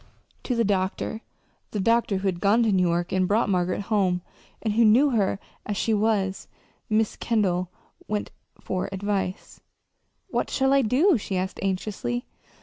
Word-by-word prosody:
To 250 Hz, -, 0 dB
the 230 Hz, -, +2 dB
doctor 195 Hz, +2 st, -1 dB, 0.5 s
the 210 Hz, -, -3 dB
doctor 230 Hz, -1 st, +2 dB
who 195 Hz, +1 st, -2 dB
had 180 Hz, -2 st, -1 dB
gone 210 Hz, +5 st, +3 dB
to 220 Hz, -, +2 dB
New 185 Hz, -2 st, +3 dB
York 175 Hz, +1 st, -1 dB
and 185 Hz, -1 st, +2 dB
brought 210 Hz, +2 st, +2 dB
Margaret 180 Hz, 0 st, 0 dB
home, 195 Hz, -4 st, +1 dB, 0.4 s
and 215 Hz, -2 st, -1 dB
who 230 Hz, +2 st, +4 dB
knew 245 Hz, +7 st, +5 dB
her 205 Hz, -5 st, +1 dB, 0.3 s
as 205 Hz, -1 st, -3 dB
she 225 Hz, -, +1 dB
was 205 Hz, -3 st, 0 dB, 0.4 s
Mrs. 215 Hz, 0 st, +1 dB
Kendall 185 Hz, -6 st, 0 dB, 0.4 s
went 210 Hz, -1 st, -2 dB, 0.3 s
for 185 Hz, -1 st, -3 dB
advice. 195 Hz, -1 st, -3 dB, 0.7 s
"What -, -, -1 dB
shall 270 Hz, 0 st, +2 dB
I 275 Hz, -, +5 dB
do?" 270 Hz, -, +3 dB
she 195 Hz, -2 st, -3 dB
asked 185 Hz, +1 st, -3 dB
anxiously. 185 Hz, -, -2 dB
205 Hz, 160 wpm, -25 LUFS, 185-225 Hz, 0.7 s, knew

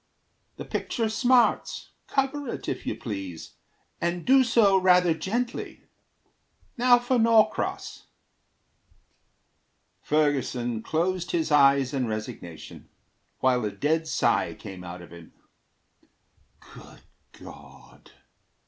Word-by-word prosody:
The -, -, -8 dB
picture 225 Hz, -3 st, -2 dB
smarts. 245 Hz, +2 st, +1 dB, 0.2 s
Cover 275 Hz, +1 st, -1 dB
it, -, -, -6 dB
if -, -, -4 dB
you -, -, -2 dB
please, 95 Hz, -7 st, -7 dB, 0.5 s
And 170 Hz, 0 st, -2 dB
do 265 Hz, +1 st, +5 dB
so 215 Hz, -6 st, +3 dB
rather 180 Hz, -2 st, +4 dB
gently. 230 Hz, +10 st, -4 dB, 0.9 s
Now 245 Hz, 0 st, +5 dB
for 245 Hz, +1 st, 0 dB
Norcross." 225 Hz, -1 st, +1 dB, 1.9 s
Ferguson 130 Hz, -6 st, 0 dB
closed 175 Hz, +5 st, -2 dB
his 160 Hz, -2 st, -1 dB
eyes 140 Hz, -2 st, +4 dB
in 130 Hz, -3 st, -1 dB
resignation, 110 Hz, -7 st, -8 dB, 0.5 s
While 125 Hz, -2 st, +2 dB
a 105 Hz, -, -1 dB
dead 155 Hz, +10 st, -1 dB
sigh -, -, 0 dB
came 95 Hz, -2 st, -10 dB
out 90 Hz, 0 st, -9 dB
of 85 Hz, -, -14 dB
him. 85 Hz, -1 st, -14 dB, 1.4 s
"Good -, -, -14 dB, 0.3 s
God!" -, -, -15 dB
160 Hz, 105 wpm, -26 LUFS, -, 1.9 s, do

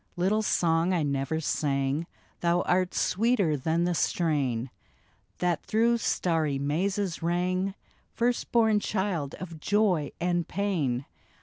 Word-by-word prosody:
Little 195 Hz, +5 st, +1 dB
song 170 Hz, -3 st, +2 dB
I 170 Hz, -4 st, +1 dB
never 140 Hz, +2 st, -1 dB
sang, 140 Hz, 0 st, -1 dB, 0.3 s
Thou 175 Hz, +1 st, +2 dB
art 180 Hz, 0 st, +1 dB
sweeter 205 Hz, -6 st, +2 dB
than 160 Hz, +5 st, 0 dB
the 175 Hz, 0 st, +1 dB
strain 135 Hz, -9 st, 0 dB, 0.7 s
That 175 Hz, -2 st, 0 dB
through 230 Hz, +2 st, +2 dB
starry 160 Hz, -9 st, 0 dB
mazes 175 Hz, +6 st, -1 dB
rang, 185 Hz, +3 st, 0 dB, 0.4 s
First 240 Hz, +1 st, -1 dB
born 220 Hz, -3 st, +4 dB
child 190 Hz, -9 st, -2 dB
of 170 Hz, -4 st, -8 dB
joy 190 Hz, -5 st, +1 dB
and 175 Hz, -1 st, 0 dB
pain. 155 Hz, -11 st, -1 dB
175 Hz, 120 wpm, -28 LUFS, 150-195 Hz, 0.7 s, born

